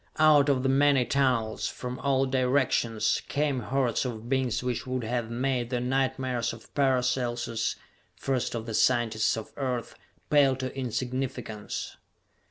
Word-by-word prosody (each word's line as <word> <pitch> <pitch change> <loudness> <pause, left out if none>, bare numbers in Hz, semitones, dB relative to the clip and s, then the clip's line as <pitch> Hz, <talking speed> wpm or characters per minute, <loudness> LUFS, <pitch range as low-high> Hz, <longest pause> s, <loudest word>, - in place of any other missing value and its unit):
Out 150 -2 +5
of 130 -2 +2
the 135 - +2
many 135 -1 +4
tunnels, 125 -5 +1
from 125 0 -6
all 135 -1 +2
directions, 125 -4 +1
came 145 -2 0
hordes 125 +1 0
of 115 -3 -5
beings 130 -2 0
which 125 0 -2
would 130 -1 -2
have 120 0 -2
made 125 0 -1
the 125 -1 -1
nightmares 130 -1 -1
of 115 - -14
Paracelsus 125 -4 0 0.4
first 130 -3 -2
of 115 -1 -4
the 115 - -5
scientists 115 -2 +2
of 110 - -7
Earth 125 -4 -2 0.4
pale 140 -3 +5
to 130 0 -5
insignificance. 125 -4 -4
125 Hz, 140 wpm, -28 LUFS, 120-135 Hz, 0.4 s, Out